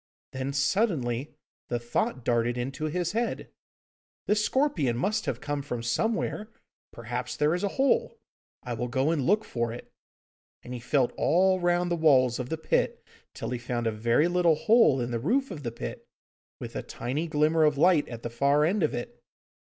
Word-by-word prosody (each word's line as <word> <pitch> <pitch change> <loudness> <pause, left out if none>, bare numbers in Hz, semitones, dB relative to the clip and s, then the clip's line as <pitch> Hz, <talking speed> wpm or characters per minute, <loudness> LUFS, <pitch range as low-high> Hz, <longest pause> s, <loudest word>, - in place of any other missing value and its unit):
Then 130 +1 -3
suddenly 140 - 0 0.3
the 120 - -1
thought 120 +1 -2
darted 120 0 +1
into 135 +5 -3
his 175 +2 -1
head, 230 +3 -2 0.7
'This 210 0 +2
scorpion 195 - +1
must 205 - -1
have - - -2
come 145 -1 -3
from 125 -4 -5
somewhere! 215 - -1 0.4
Perhaps 120 +2 -5
there 150 +2 +2
is 180 - -2
a - - +2
hole. 465 - +2 0.5
I 125 - -4
will 120 +2 -3
go 130 +5 +1
and 160 -4 0
look 210 +4 +3
for 120 -1 -2
it,' 120 - -10 0.7
and 125 - -8
he 125 - -5
felt 125 +1 +1
all 185 +2 +3
round 175 0 +1
the - - +2
walls 130 -7 +4
of 125 0 -4
the 160 - -2
pit 160 - -1 0.3
till - - -5
he 125 - -2
found 120 0 -3
a 115 - +1
very 115 +8 +2
little 175 -2 +3
hole 210 - +4
in 120 0 -2
the 115 - -1
roof 255 - 0
of 160 -5 -6
the 120 -4 -4
pit, 115 - -7 0.5
with - - -8
a - - -2
tiny 140 +8 -4
glimmer 155 +1 +2
of 150 -2 +3
light 160 0 +4
at 115 -1 -8
the 120 - -4
far 140 +5 +3
end 195 +5 +1
of 155 - +1
it. 120 - -7
145 Hz, 190 wpm, -27 LUFS, 120-175 Hz, 0.7 s, walls